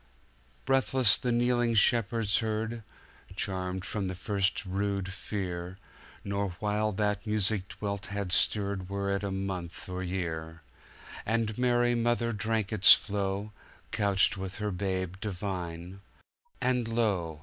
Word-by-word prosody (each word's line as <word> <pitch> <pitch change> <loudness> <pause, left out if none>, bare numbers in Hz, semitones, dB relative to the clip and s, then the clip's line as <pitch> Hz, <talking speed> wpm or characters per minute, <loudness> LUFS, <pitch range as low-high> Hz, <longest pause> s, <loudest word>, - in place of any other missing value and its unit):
Breathless 130 -4 +4
the 125 - -2
kneeling 120 -1 +2
shepherds 110 -2 +3
heard, 110 +1 -2 0.5
Charmed 95 -2 -3
from 100 -3 -2
their 95 - -4
first 100 +1 -1
rude 95 0 -2
fear, 90 -3 -5 0.5
Nor 100 -2 -2
while 105 +1 0
that 105 +1 -1
music 105 -2 +1
dwelt 100 0 -5
had 100 -2 -4
stirred 100 -1 +3
Were 100 0 -2
it 100 0 0
a 100 - -1
month 95 -3 -4
or 90 0 -4
year:And 85 - -4
Mary 120 0 +2
Mother 120 0 +1
drank 110 0 -1
its 100 -1 +9
flow, 100 0 -3 0.4
Couched 100 -1 +2
with 95 0 -5
her 105 -1 -2
Babe 95 -1 -2
divine, 90 -2 -5 0.6
and, 125 -2 +1
lo! 100 -9 0
100 Hz, 125 wpm, -29 LUFS, 95-110 Hz, 0.6 s, its